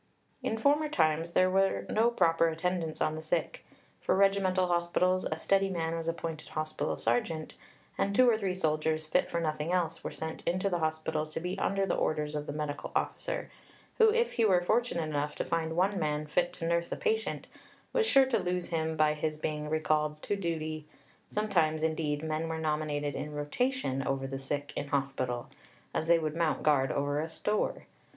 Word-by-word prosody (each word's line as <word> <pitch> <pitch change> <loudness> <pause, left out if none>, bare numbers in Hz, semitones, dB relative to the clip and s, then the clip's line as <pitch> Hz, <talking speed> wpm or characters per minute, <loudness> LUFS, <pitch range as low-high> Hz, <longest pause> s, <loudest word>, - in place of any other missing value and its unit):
"In 225 - -1
former 295 +5 +3
times 165 - +1
there 185 0 +4
were 195 +1 +2
no 225 +2 +3
proper 165 -7 +3
attendants 165 0 -2
on 155 - +2
the 155 - -5
sick. 160 0 -2 0.4
For - - +2
regimental 195 -1 +3
hospitals 180 +1 +1
a 155 - -2
steady 195 +3 +2
man 165 -3 -1
was 165 0 -4
appointed 165 -1 -4
hospital 155 0 -2
sergeant, 155 +8 -1 0.5
and 200 +1 +1
two 255 +2 +6
or 235 - +5
three 195 -4 -1
soldiers, 155 -2 0
fit 180 +4 +1
for 170 - -1
nothing 155 0 -1
else, 170 -3 0
were - - -4
sent 160 0 -5
into 185 +3 +1
the 175 - +1
hospital 155 -1 -1
to 155 - -5
be 180 +3 -3
under 195 0 +1
the - - 0
orders 150 -1 0
of 150 0 -3
the - - -2
medical 150 -1 -4
officer, - - -2 0.5
who, 445 -1 +7
if 470 +1 +2
he 230 - +1
were 190 -5 +5
fortunate 220 -3 +1
enough 150 -1 -2
to - - -2
find 160 -1 -1
one 195 +3 +2
man 150 -1 -1
fit 175 +3 +1
to 170 - -5
nurse 170 0 0
a - - 0
patient, 445 -2 -1 0.5
was 460 -3 +2
sure 270 -7 +6
to 260 - +1
lose 180 0 -2
him 160 -1 -1
by 155 0 +4
his 155 0 -2
being 150 -1 -3
recalled 155 -1 +1
'to 205 - 0
duty'; 155 -4 -3 0.4
sometimes, 165 -7 +1
indeed, 155 -2 0
men 160 +1 -2
were 160 - -2
nominated 150 -2 -1
in 150 +2 -5
rotation 145 - -1
over 135 0 -1
the 135 0 -4
sick 145 +1 -3
in - - -3
hospital 135 -4 -1 0.5
as 160 - -1
they 170 0 +6
would 155 -1 -2
mount 165 -2 0
guard 140 -3 +3
over 145 +1 0
a 160 - -4
store. 210 +5 -1
160 Hz, 190 wpm, -30 LUFS, 155-185 Hz, 0.5 s, who